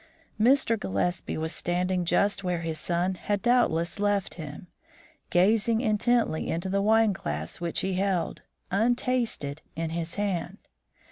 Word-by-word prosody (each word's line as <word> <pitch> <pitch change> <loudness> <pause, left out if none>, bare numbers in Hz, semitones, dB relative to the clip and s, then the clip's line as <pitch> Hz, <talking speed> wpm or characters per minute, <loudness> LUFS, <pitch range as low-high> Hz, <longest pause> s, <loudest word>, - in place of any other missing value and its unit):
Mr. 240 -2 +4
Gillespie 100 - -1
was 160 0 -2
standing 180 +1 0
just 200 +3 +1
where 180 -2 -1
his 160 -2 -3
son 175 +3 0
had 205 +2 -2
doubtless 210 -8 +2
left 205 -1 +1
him, 155 -1 -8 0.6
gazing 215 +5 +3
intently 225 -5 +1
into 170 +3 -2
the 200 +1 +1
wine 220 0 +4
glass 75 - -5
which 170 -1 -1
he 190 0 -1
held, 185 -2 -1 0.3
untasted, 225 - 0
in 165 0 -3
his 165 0 -3
hand. 195 -2 -2
185 Hz, 135 wpm, -27 LUFS, 170-215 Hz, 0.6 s, Mr